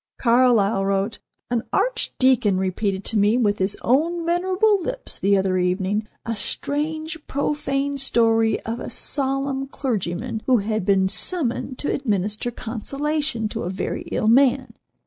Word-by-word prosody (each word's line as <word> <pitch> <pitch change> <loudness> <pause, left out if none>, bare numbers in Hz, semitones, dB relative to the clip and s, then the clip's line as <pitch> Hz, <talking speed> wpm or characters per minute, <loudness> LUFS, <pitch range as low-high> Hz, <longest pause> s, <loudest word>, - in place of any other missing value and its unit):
Carlyle 230 -5 +3
wrote: 195 +2 -1 0.3
"An 240 -2 +1
archdeacon 260 - +2
repeated 190 +1 -1
to 220 - 0
me, 205 +4 +3
with 210 -4 +1
his 190 +1 -1
own 330 +7 +1
venerable 375 +4 +2
lips, - - -5
the 200 +1 +3
other 190 -1 +1
evening, 190 +4 -1 0.2
a 230 - -2
strange, 310 +8 -2
profane 280 -1 -1
story 225 -3 +2
of 230 +2 -5
a - - -6
solemn 275 0 -1
clergyman 220 -4 -3
who 255 -2 +5
had 215 -2 -2
been 195 -1 +3
summoned 255 - +3
to - - -1
administer 210 -2 -1
consolation 250 +2 -3
to - - -5
a 175 - -3
very 190 - -3
ill 215 - 0
man. 255 0 +3
235 Hz, 140 wpm, -22 LUFS, 205-280 Hz, 0.3 s, who